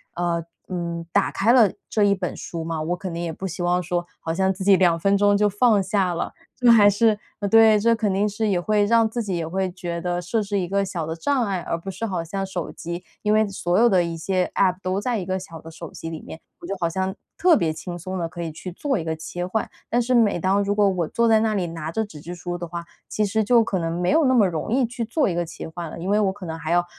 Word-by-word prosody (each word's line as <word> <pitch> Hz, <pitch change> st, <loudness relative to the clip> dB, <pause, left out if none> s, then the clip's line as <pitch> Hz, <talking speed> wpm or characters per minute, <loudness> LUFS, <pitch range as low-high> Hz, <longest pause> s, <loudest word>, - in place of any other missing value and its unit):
呃 170 Hz, -1 st, -1 dB, 0.2 s
嗯， 170 Hz, -2 st, -4 dB
打 200 Hz, -, +2 dB
开 220 Hz, +4 st, +2 dB
了 225 Hz, -7 st, +6 dB, 0.2 s
这 215 Hz, -, +2 dB
一 200 Hz, -1 st, +4 dB
本 185 Hz, -2 st, -3 dB
书 165 Hz, -1 st, -5 dB
嘛， 165 Hz, -1 st, -3 dB
我 170 Hz, +3 st, -1 dB
肯 185 Hz, 0 st, -6 dB
定 170 Hz, +1 st, -3 dB
也 170 Hz, -, -2 dB
不 190 Hz, +4 st, -5 dB
希 180 Hz, 0 st, -5 dB
望 175 Hz, +1 st, +2 dB
说 175 Hz, 0 st, -2 dB
好 160 Hz, -, -3 dB
像 190 Hz, +2 st, +1 dB
自 190 Hz, +1 st, -6 dB
己 195 Hz, 0 st, +6 dB
2 175 Hz, -3 st, +3 dB
分 195 Hz, +3 st, +3 dB
钟 205 Hz, 0 st, +4 dB
就 210 Hz, +1 st, +3 dB
放 205 Hz, +1 st, +3 dB
下 190 Hz, -2 st, 0 dB
了。 170 Hz, -, -3 dB, 0.3 s
这 245 Hz, -2 st, +5 dB
还 210 Hz, -3 st, +7 dB
是 210 Hz, +1 st, +2 dB, 0.2 s
呃， 205 Hz, -, -1 dB
对 220 Hz, 0 st, +6 dB
这 230 Hz, +2 st, +3 dB
肯 220 Hz, -3 st, 0 dB
定 200 Hz, +2 st, +1 dB
是 210 Hz, +2 st, -1 dB
也 190 Hz, -4 st, +1 dB
会 210 Hz, +3 st, +2 dB
让 230 Hz, +1 st, +4 dB
自 235 Hz, +2 st, -3 dB
己 195 Hz, -5 st, -2 dB
也 165 Hz, -1 st, -3 dB
会 190 Hz, +2 st, -1 dB
觉 175 Hz, -2 st, -5 dB
得 175 Hz, 0 st, -1 dB
设 180 Hz, +6 st, -1 dB
置 200 Hz, -1 st, -1 dB
一 180 Hz, -, -2 dB
个 200 Hz, +2 st, +1 dB
小 185 Hz, -4 st, -3 dB
的 160 Hz, +1 st, -4 dB
障 255 Hz, +10 st, 0 dB
碍， 195 Hz, -3 st, -1 dB
而 165 Hz, -, -2 dB
不 170 Hz, +3 st, -8 dB
是 205 Hz, -, -8 dB
好 185 Hz, -6 st, -2 dB
像 195 Hz, +4 st, -4 dB
手 185 Hz, -3 st, -4 dB
机， 170 Hz, +1 st, -6 dB, 0.2 s
因 210 Hz, -, +1 dB
为 215 Hz, 0 st, +4 dB
所 180 Hz, -2 st, -1 dB
有 240 Hz, -, +6 dB
的 185 Hz, -6 st, +4 dB
一 170 Hz, -1 st, -4 dB
些 180 Hz, +2 st, -1 dB
App 185 Hz, -2 st, +3 dB
都 185 Hz, +1 st, -1 dB
在 235 Hz, +1 st, -1 dB
一 185 Hz, -, -5 dB
个 185 Hz, +1 st, -1 dB
小 165 Hz, -4 st, -10 dB
的 165 Hz, -, -10 dB
手 165 Hz, 0 st, -9 dB
机 165 Hz, -, -7 dB
里 160 Hz, -1 st, -6 dB
面， 160 Hz, -, -10 dB, 0.2 s
我 -, -, -10 dB
就 195 Hz, +3 st, -3 dB
好 170 Hz, -, +2 dB
像 190 Hz, +2 st, -2 dB, 0.2 s
特 355 Hz, -2 st, +5 dB
别 165 Hz, -, +1 dB
轻 160 Hz, +3 st, -6 dB
松 185 Hz, +3 st, -5 dB
地 170 Hz, -2 st, -2 dB
可 175 Hz, +1 st, -8 dB
以 165 Hz, -1 st, -3 dB
去 180 Hz, +4 st, -8 dB
做 270 Hz, -, -1 dB
一 170 Hz, -, -3 dB
个 160 Hz, 0 st, -2 dB
切 160 Hz, +3 st, -5 dB
换， 205 Hz, +4 st, -2 dB, 0.2 s
但 240 Hz, -, +1 dB
是 250 Hz, +2 st, +1 dB
每 215 Hz, -6 st, +3 dB
当 195 Hz, +3 st, +2 dB
如 200 Hz, 0 st, 0 dB
果 205 Hz, -1 st, +3 dB
我 180 Hz, -4 st, -1 dB
坐 235 Hz, +7 st, +1 dB
在 220 Hz, -1 st, +5 dB
那 220 Hz, -1 st, +1 dB
里 190 Hz, -4 st, -1 dB
拿 165 Hz, -1 st, -5 dB
着 220 Hz, +6 st, 0 dB
纸 185 Hz, -8 st, -10 dB
质 170 Hz, +4 st, -7 dB
书 175 Hz, 0 st, -5 dB
的 175 Hz, 0 st, -6 dB
话， 170 Hz, 0 st, -5 dB, 0.2 s
其 215 Hz, -, -1 dB
实 215 Hz, +2 st, +1 dB
就 235 Hz, +2 st, +5 dB
可 200 Hz, -3 st, -2 dB
能 165 Hz, -1 st, -2 dB
没 175 Hz, -, +1 dB
有 315 Hz, +1 st, +4 dB
那 260 Hz, -, +4 dB
么 220 Hz, -6 st, +5 dB
容 165 Hz, +1 st, -3 dB
易 265 Hz, +1 st, +3 dB
去 235 Hz, 0 st, -4 dB
做 255 Hz, +3 st, +1 dB
一 175 Hz, -, -2 dB
个 175 Hz, 0 st, 0 dB
切 160 Hz, -, -8 dB
换 170 Hz, +1 st, -6 dB
了。 -, -, -8 dB
因 180 Hz, +3 st, -4 dB
为 205 Hz, +1 st, +3 dB
我 195 Hz, -2 st, +1 dB
可 195 Hz, -3 st, -9 dB
能 160 Hz, 0 st, -4 dB
还 165 Hz, 0 st, -4 dB
要 175 Hz, 0 st, +4 dB
190 Hz, 315 characters per minute, -23 LUFS, 170-210 Hz, 0.3 s, 还